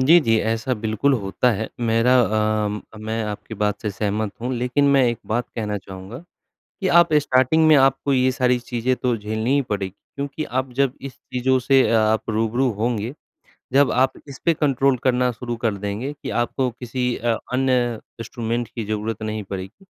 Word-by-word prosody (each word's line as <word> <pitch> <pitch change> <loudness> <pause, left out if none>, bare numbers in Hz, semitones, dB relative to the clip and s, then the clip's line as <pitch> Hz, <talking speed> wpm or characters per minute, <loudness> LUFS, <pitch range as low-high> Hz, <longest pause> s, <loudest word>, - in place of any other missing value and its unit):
जी, 155 +7 +7
जी। 115 -5 +2
ऐसा 115 +4 -1
बिल्कुल 110 +5 0
होता 100 +6 +1
है। 110 +1 -3
मेरा 115 +2 +3
अम 105 -1 0
अ, - - -11
मैं 110 +1 -3
आपकी 105 +1 -6
बात 105 0 -1
से 105 - -1
सहमत 105 +1 -2
हूँ 125 +2 -2
लेकिन 125 +4 +1
मैं 140 -1 +5
एक 120 -2 0
बात 120 +2 -1
कहना 105 -2 -2
चाहूँगा 95 +4 -9 0.6
कि 190 - +1
आप 170 -2 +3
स्टार्टिंग 145 +1 +3
में 155 - +7
आपको 135 0 +3
ये 130 0 +3
सारी 125 -1 +2
चीज़ें 125 +1 -1
तो 125 -1 0
झेलनी 110 +5 -2
ही 140 - +3
पड़ेगी 105 -7 -3 0.3
क्योंकि 140 +2 -4
आप 130 +1 -2
जब 135 0 +1
इस 135 -1 -7 0.2
चीज़ों 130 +1 +2
से 135 +2 +4
ये - - +2
अ 115 - +3
आप 110 +1 +1
रूबरू 115 +4 +1
होंगे, 110 +2 -2 0.6
जब 140 +1 +4
आप 130 +1 +3 0.2
इसपे 140 +4 0
कंट्रोल 135 -3 +2
करना 125 -1 +2
शुरू 120 0 -5
कर 115 -2 -1
देंगे 105 +7 -4
कि - - -4
आपको 125 +2 -1
किसी 125 +1 -3
अ, 115 -1 0 0.2
अन्य 125 -2 +2 0.3
इंस्ट्रूमेंट 115 +1 -3
की 115 -1 -5
ज़रूरत 110 +1 -3
नहीं 110 0 -3
पड़ेगी। 95 - -8
120 Hz, 185 wpm, -22 LUFS, 110-130 Hz, 0.6 s, जी